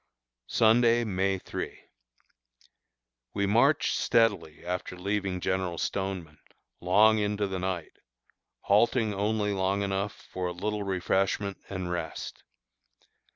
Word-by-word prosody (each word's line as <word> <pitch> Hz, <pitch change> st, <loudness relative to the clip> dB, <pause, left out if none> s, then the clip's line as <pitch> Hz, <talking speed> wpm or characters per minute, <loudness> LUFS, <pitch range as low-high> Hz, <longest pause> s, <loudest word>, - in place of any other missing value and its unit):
Sunday, 115 Hz, +1 st, +4 dB
May 95 Hz, -2 st, 0 dB
3. -, -, -6 dB, 1.6 s
We 100 Hz, 0 st, +1 dB
marched 120 Hz, +9 st, +3 dB
steadily 100 Hz, -11 st, +1 dB
after 90 Hz, 0 st, -4 dB
leaving 95 Hz, 0 st, -2 dB
General 95 Hz, -1 st, -1 dB
Stoneman, 95 Hz, -6 st, -3 dB, 0.4 s
long 105 Hz, +5 st, +5 dB
into 105 Hz, 0 st, 0 dB
the 95 Hz, -1 st, -3 dB
night, 90 Hz, -3 st, -4 dB, 0.6 s
halting 110 Hz, +1 st, +3 dB
only 105 Hz, +1 st, 0 dB
long 95 Hz, +1 st, 0 dB
enough 100 Hz, +1 st, -3 dB
for 90 Hz, -1 st, -2 dB
a 90 Hz, -, -3 dB
little 105 Hz, +4 st, -3 dB
refreshment 95 Hz, +1 st, 0 dB
and 95 Hz, -2 st, -4 dB
rest. 90 Hz, -, -5 dB
100 Hz, 110 wpm, -28 LUFS, 90-105 Hz, 1.6 s, long